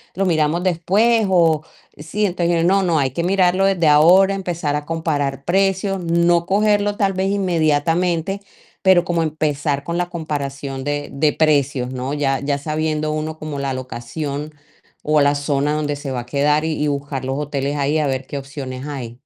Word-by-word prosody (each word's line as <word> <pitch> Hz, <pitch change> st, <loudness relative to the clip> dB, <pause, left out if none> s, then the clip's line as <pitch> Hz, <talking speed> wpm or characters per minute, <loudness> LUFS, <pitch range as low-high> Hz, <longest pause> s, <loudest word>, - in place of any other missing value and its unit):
lo 195 Hz, +1 st, 0 dB
miramos 160 Hz, 0 st, +1 dB
después", 200 Hz, +6 st, +2 dB
o 165 Hz, -4 st, +3 dB, 0.4 s
sí, 165 Hz, +8 st, -2 dB
entonces: 170 Hz, -2 st, 0 dB
"No, 195 Hz, +1 st, +3 dB
no, 165 Hz, -4 st, +2 dB
hay 135 Hz, -2 st, 0 dB
que 170 Hz, +5 st, -3 dB
mirarlo 185 Hz, 0 st, +2 dB
desde 180 Hz, -5 st, +2 dB
ahora, 180 Hz, +6 st, +6 dB
empezar 170 Hz, -6 st, -2 dB
a 145 Hz, -, -6 dB
comparar 145 Hz, -4 st, -2 dB
precios", 195 Hz, +1 st, +1 dB
no 170 Hz, 0 st, +2 dB
cogerlo 205 Hz, +1 st, +2 dB
tal 195 Hz, -3 st, +1 dB
vez 190 Hz, +1 st, -1 dB
inmediatamente, 170 Hz, 0 st, +1 dB, 0.4 s
pero 185 Hz, -2 st, +5 dB
como 170 Hz, -2 st, 0 dB
empezar 150 Hz, -2 st, -1 dB
con 170 Hz, 0 st, -2 dB
la 175 Hz, 0 st, -1 dB
comparación 140 Hz, -5 st, -4 dB
de 145 Hz, 0 st, -3 dB
de 150 Hz, +2 st, +2 dB
precios, 140 Hz, -5 st, +1 dB
¿no?, 130 Hz, +2 st, -3 dB
ya 135 Hz, -3 st, 0 dB
ya 140 Hz, 0 st, -1 dB
sabiendo 155 Hz, +1 st, -2 dB
uno 155 Hz, +1 st, -4 dB
como 155 Hz, -2 st, -6 dB
la 140 Hz, -1 st, -2 dB
locación 140 Hz, +4 st, -5 dB, 0.6 s
o 155 Hz, -1 st, +4 dB
la 145 Hz, 0 st, +3 dB
zona 145 Hz, 0 st, 0 dB
donde 145 Hz, -1 st, -1 dB
se 140 Hz, -1 st, -6 dB
va 125 Hz, -2 st, -2 dB
a -, -, -11 dB
quedar 150 Hz, +4 st, +1 dB
y 155 Hz, -2 st, -1 dB
y -, -, +1 dB
buscar 140 Hz, -1 st, -3 dB
los 135 Hz, +1 st, -2 dB
hoteles 145 Hz, -1 st, -2 dB
ahí 145 Hz, +2 st, +1 dB
a 150 Hz, -, +1 dB
ver 130 Hz, 0 st, -2 dB
qué 140 Hz, -, -5 dB
opciones 135 Hz, -2 st, -7 dB
hay. 125 Hz, -5 st, -6 dB
155 Hz, 180 wpm, -20 LUFS, 140-175 Hz, 0.6 s, ahora